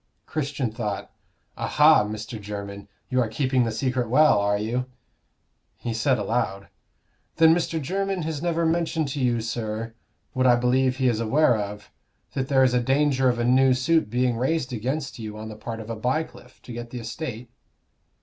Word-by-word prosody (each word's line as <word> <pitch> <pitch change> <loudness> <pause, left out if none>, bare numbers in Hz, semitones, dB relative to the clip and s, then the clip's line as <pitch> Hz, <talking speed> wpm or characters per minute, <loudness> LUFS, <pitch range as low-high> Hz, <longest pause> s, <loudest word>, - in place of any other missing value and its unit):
Christian 140 -5 -2
thought, 105 -3 -4 0.5
"Aha, 150 -5 +5
Mr. 110 +2 -6
Jermyn! 100 -1 -7 0.2
you 130 0 +3
are 120 - +1
keeping 130 +2 +1
the 115 - -1
secret 125 0 -1
well, 150 -2 +5
are 100 0 +1
you?" 120 +4 -2 0.9
He 120 - -4
said, 125 +3 +2
aloud 100 -4 -2 0.7
"Then 160 0 +6
Mr. 165 -1 -1
Jermyn 195 +4 -2
has 155 -2 -3
never 170 -1 0
mentioned 165 -2 0
to 140 - -4
you, 120 -3 +1
sir, 115 0 -4 0.4
what 130 0 +2
I 120 - +6
believe 125 +1 +2
he 130 -1 +2
is 115 -3 +1
aware 125 +3 +3
of 105 -1 -5 0.4
that 135 -1 -2
there 135 -1 +4
is 130 -1 +3
danger 135 +1 +2
of 120 - 0
a 120 - 0
new 130 +1 +4
suit 160 +2 +2
being 125 0 +1
raised 130 +1 -1
against 130 +3 -3
you 110 -1 -6
on 110 0 -7
the 110 - -8
part 115 +1 -6
of 110 +1 -7
a - - -3
Bycliffe, 125 +2 -4
to 120 - -9
get 120 0 -6
the 125 - -7
estate?" 120 -1 -6
125 Hz, 180 wpm, -25 LUFS, 115-140 Hz, 0.9 s, Then